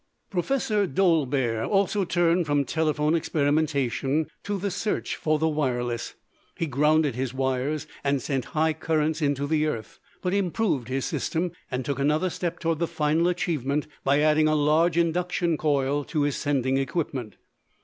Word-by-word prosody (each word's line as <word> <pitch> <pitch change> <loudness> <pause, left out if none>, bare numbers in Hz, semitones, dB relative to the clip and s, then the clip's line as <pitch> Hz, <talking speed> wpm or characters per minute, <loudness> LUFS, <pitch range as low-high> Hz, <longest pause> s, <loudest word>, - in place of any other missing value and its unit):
Professor 210 0 0
Dolbear 140 - +1
also 200 - +1
turned 170 0 +2
from 145 -1 +2
telephone 155 0 +1
experimentation 145 -2 +1 0.2
to 205 0 -3
the 200 +1 -2
search 200 +3 -2
for 155 0 +1
the 160 +1 +1
wireless. 125 -6 -1 0.4
He 165 - 0
grounded 150 0 +2
his 130 +1 -3
wires 135 +3 -1 0.2
and 140 -1 +1
sent 130 -1 -2
high 160 +1 +3
currents 160 0 0
into 145 -1 +1
the 155 +1 +1
earth, 115 -7 -5 0.2
but 180 0 0
improved 190 - 0
his 130 +1 -2
system 175 +1 -1 0.2
and 130 0 -3
took 140 +2 -2
another 150 +6 +1
step 175 0 -3
toward 165 -2 -1
the 170 - +1
final 155 +3 +1
achievement 150 -5 -1 0.2
by 140 +2 +3
adding 155 0 +4
a 155 - +2
large 155 +3 +3
induction 170 0 +1
coil 145 -1 +1
to 150 -3 -1
his 145 -1 0
sending 135 -2 0
equipment. 135 - -3
155 Hz, 155 wpm, -26 LUFS, 140-170 Hz, 0.4 s, adding